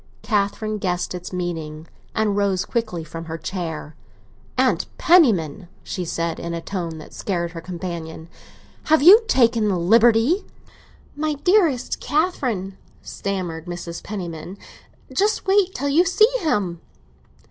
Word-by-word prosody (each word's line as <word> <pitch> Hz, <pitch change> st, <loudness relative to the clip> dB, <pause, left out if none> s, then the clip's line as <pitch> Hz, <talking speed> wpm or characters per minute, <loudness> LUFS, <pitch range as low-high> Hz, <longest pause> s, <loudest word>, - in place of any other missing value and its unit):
Catherine 215 Hz, 0 st, -1 dB
guessed 180 Hz, -2 st, -2 dB
its 180 Hz, 0 st, -7 dB
meaning, 165 Hz, -4 st, -4 dB, 0.3 s
and 215 Hz, -2 st, +1 dB
rose 200 Hz, -2 st, +1 dB
quickly 220 Hz, -8 st, -2 dB
from 165 Hz, +1 st, -8 dB
her 160 Hz, 0 st, -5 dB
chair. 160 Hz, -3 st, -5 dB, 0.6 s
"Aunt 255 Hz, 0 st, +2 dB
Penniman," 205 Hz, -, +3 dB, 0.2 s
she 180 Hz, -, -4 dB
said, 165 Hz, 0 st, -2 dB
in 170 Hz, 0 st, -4 dB
a -, -, -3 dB
tone 170 Hz, -2 st, -5 dB
that 155 Hz, -, -12 dB
scared 170 Hz, -4 st, -2 dB
her 165 Hz, -1 st, -7 dB
companion, 170 Hz, -2 st, -6 dB, 0.6 s
"have 310 Hz, -2 st, +4 dB
you 400 Hz, +8 st, +10 dB
taken 235 Hz, -, +3 dB
the 195 Hz, -3 st, +1 dB
liberty... 230 Hz, -, +4 dB, 0.4 s
?" -, -, -29 dB
"My 305 Hz, 0 st, -1 dB
dearest 335 Hz, -, +2 dB
Catherine," 255 Hz, -, -1 dB, 0.2 s
stammered 180 Hz, -4 st, -4 dB
Mrs. 175 Hz, -1 st, -6 dB
Penniman, 180 Hz, -2 st, -6 dB, 0.6 s
"just 415 Hz, +2 st, +1 dB
wait 385 Hz, -1 st, +3 dB
till 285 Hz, +2 st, -1 dB
you 315 Hz, +5 st, +5 dB
see 430 Hz, +6 st, +4 dB
him!" 195 Hz, -, -1 dB
195 Hz, 135 wpm, -22 LUFS, 170-260 Hz, 0.6 s, you